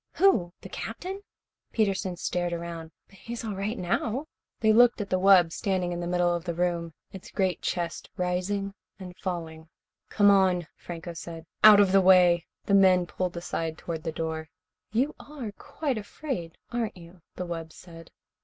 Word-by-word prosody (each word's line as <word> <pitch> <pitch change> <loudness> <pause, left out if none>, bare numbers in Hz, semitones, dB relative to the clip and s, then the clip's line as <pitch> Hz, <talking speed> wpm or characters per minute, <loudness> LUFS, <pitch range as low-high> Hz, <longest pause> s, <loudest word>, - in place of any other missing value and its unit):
"Who? 360 - +3
The 190 - -10
Captain?" 370 - -6 0.5
Peterson 195 -4 0
stared 175 0 -1
around. 170 -1 -5 0.2
"But 195 - -20
he's 235 0 -6
all 215 - -3
right 205 +5 -3
now." 225 - -1 0.3
They 220 -1 +4
looked 240 +1 +6
at 205 - -4
the 185 - +2
wub, 185 -3 +6
standing 185 -1 -1
in 175 - -3
the 175 - -3
middle 175 0 +2
of 170 -1 -3
the 170 -2 -3
room, 170 -2 -1 0.2
its 190 - -9
great 190 -3 0
chest 170 -2 -3
rising 185 +2 -1 0.2
and 180 -2 -9
falling. 165 -4 -5 0.4
"Come 205 -1 +5
on," 185 -3 +3
Franco 170 0 -7
said. 165 0 -8 0.2
"Out 210 -1 +10
of 200 -2 +5
the 195 0 +6
way." 180 -2 +5 0.2
The 200 - 0
men 185 -2 +6
pulled 180 0 -3
aside 165 -2 -3
toward 165 -2 -5
the 160 - -2
door. 160 0 -4 0.4
"You 260 +7 +1
are 275 -7 -7
quite 265 +3 -3
afraid, 205 - -5
aren't 235 -5 -2
you?" 170 +1 -14
the 180 - -4
wub 165 -2 -5
said. 165 -1 -13
180 Hz, 170 wpm, -27 LUFS, 170-205 Hz, 0.5 s, Out